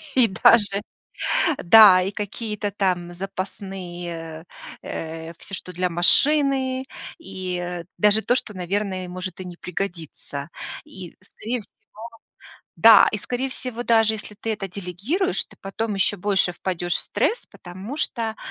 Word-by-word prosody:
и 250 -3 +5
даже, 200 0 +5 0.8
да, 195 -1 +9
и 190 +2 -2
какие-то 210 0 -4
там 180 -3 -1
запасные 175 -3 -6 0.4
э, 160 +1 -6
всё, 195 - -7
что 180 - -9
для 180 +1 0
машины, 265 - +3 0.3
и, 185 -1 -5
э, 175 -1 -5
даже 210 +1 +4
то, 245 - +2
что, 215 -4 -3
наверное, 185 0 -2
может 185 0 -6
и 185 - -6
не 175 -1 -8
пригодиться. 165 -6 -5 0.4
И 185 -3 -10
скорее 230 +5 -5
всего - - -16 1.0
Да, 220 -2 +8
и 210 - -1
скорее 250 +6 -3
всего, 250 -2 -5
даже 225 -1 +4
если 210 -1 -8
ты 225 - -1
это 195 -2 -4
делегируешь, 200 - -2
ты - - -20
потом 210 +2 -3
еще 195 +1 +1
больше 195 -2 +1
впадешь 175 -1 -2
в - - 0
стресс, 475 - -1
потому 190 +10 -8
что, 225 -7 -2
195 Hz, 140 wpm, -23 LUFS, 180-220 Hz, 1.0 s, да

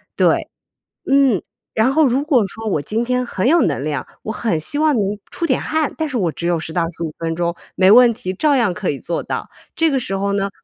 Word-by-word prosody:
对。 - - +2 0.6
嗯， 270 -8 +4 0.3
然 245 +5 +2
后 310 -1 +4
如 260 +3 +1
果 255 - +2
说 220 +4 -8
我 155 -8 0
今 220 +9 -2
天 250 0 0
很 235 -1 -1
有 335 +3 +5
能 140 -4 0
量， 145 -3 -3 0.2
我 220 - -3
很 220 -5 -1
希 290 - 0
望 310 -2 +3
能 205 -2 -1
出 340 - -3
点 260 -6 +1
汗， 315 -1 -1
但 315 - -1
是 260 -4 -3
我 175 -6 0
只 170 - -4
有 175 - +2
10 160 +1 -6
到 175 - +1
15 165 -2 -6
分 165 0 -2
钟， 170 0 -1 0.2
没 190 +1 +5
问 245 +1 +8
题， 185 -4 -5
照 285 +8 +2
样 225 -8 +2
可 195 -1 -3
以 140 - -1
做 170 - -3
到。 - - -4 0.3
这 325 -2 +2
个 270 - +1
时 195 -5 -3
候 200 +1 -1
呢， 200 0 0
215 Hz, 250 characters per minute, -19 LUFS, 175-265 Hz, 0.6 s, 问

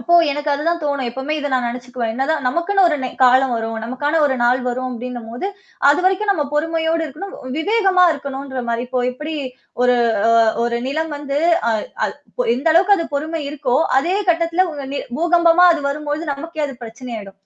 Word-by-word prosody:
அப்போ 340 +8 +2 0.2
எனக்கு 295 +1 -2
அதுதான் 335 +4 0
தோணும். 280 -4 -1
எப்பவுமே 265 +5 -3
இத 290 -1 -2
நான் 250 -2 +1
நினைச்சுக்குவேன். 245 -1 -4
என்னதான் 275 +3 -1
நமக்குன்னு 370 +8 +2
ஒரு 305 - 0
நெ 255 - -2 0.2
காலம் 255 +1 +4
வரும். 225 0 -3
நமக்கான 290 +7 -1
ஒரு 270 - 0
நாள் 250 +2 +3
வரும் 255 +1 -2
அப்டின்னும்போது, 240 +4 -6 0.4
அதுவரைக்கும் 375 +6 +2
நம்ம 305 -6 -1
பொறுமையோடு 325 +1 0
இருக்கணும், 315 +8 -8 0.2
விவேகமா 385 0 +3
இருக்கணுன்ற 275 -3 -5
மாரி. 235 0 -1
இப்போ 255 0 -1
எப்படி 300 +5 -6 0.5
ஒரு 250 0 +4 0.3
அ - - +5 0.3
ஒரு 235 0 -1
நிலம் 315 +3 -2
வந்து 285 -1 -3 0.3
அ - - +2 0.3
அ - - -2 0.3
பொ - - +2
எந்த 285 +6 +1
அளவுக்கு 385 +4 +5
அது 335 -3 -2
பொறுமை 315 +3 -3
இருக்கோ, 275 -4 0 0.2
அதே 345 +8 0
கட்டத்தில 335 +2 +1
உ - - -8 0.2
ந - - -1 0.2
பூகம்பமா 345 +1 +5
அது 310 - -4
வரும்போழுது 300 +1 -3
நமக்கே 315 +2 -6
அது 270 -2 -8
பிரச்சனயிடும். 225 -4 -8
290 Hz, 175 wpm, -19 LUFS, 250-330 Hz, 0.5 s, அ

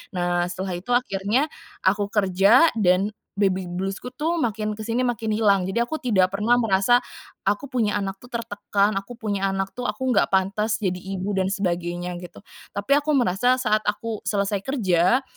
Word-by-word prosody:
Nah, 175 0 +1
setelah 185 +1 -4
itu 195 +7 -7
akhirnya 230 +4 +1 0.4
aku 200 +2 +2
kerja 205 - +5
dan 195 +1 +3 0.3
baby 190 -3 +1
blues-ku 195 +7 -4
tuh 315 +6 -1
makin 215 -7 -1
kesini, 230 +3 -2
makin 225 -2 -2
hilang. 205 -3 +3
Jadi, 190 +5 -2
aku 240 +6 -1
tidak 200 -8 +3
pernah 235 +4 +3
merasa, 225 +2 +3 0.5
"Aku 205 +7 0
punya 225 -5 +1
anak 195 -1 -3
tuh, 245 - -14
tertekan, 210 -3 -1
aku 195 +5 -10
punya 205 -4 -1
anak 195 0 -2
tuh, 245 0 -3
aku 260 -1 -1
nggak 210 - +3
pantes 200 +3 +1
jadi 180 -1 0
ibu, 195 +1 -4
dan 190 0 +1
sebagainya," 175 -2 -2
gitu. 175 +2 -12 0.3
Tapi, 200 +6 -4
aku 300 0 0
merasa 245 0 +3
saat 215 -4 +1
aku 215 +1 -2
selesai 200 0 0
kerja. 205 -1 +2
205 Hz, 170 wpm, -24 LUFS, 190-235 Hz, 0.5 s, kerja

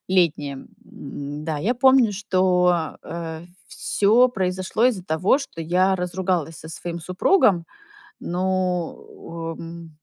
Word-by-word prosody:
летнее. 150 -7 +1 0.2
М-да, 150 +2 -6
я 215 +12 0
помню, 260 -3 +5
что, 180 -4 +1
э, 165 -1 -6 0.2
всё 225 +5 +3
произошло 185 0 -1
из-за 210 -8 -1
того, 175 - +2
что 275 - -8
я 185 +4 +2
разругалась 180 -3 -2
со 160 - -10
своим 170 +2 -6
супругом. 185 - +3 0.6
Ну, 180 -2 -3
в - - -10
э 165 0 -9
180 Hz, 115 wpm, -23 LUFS, 165-190 Hz, 0.6 s, помню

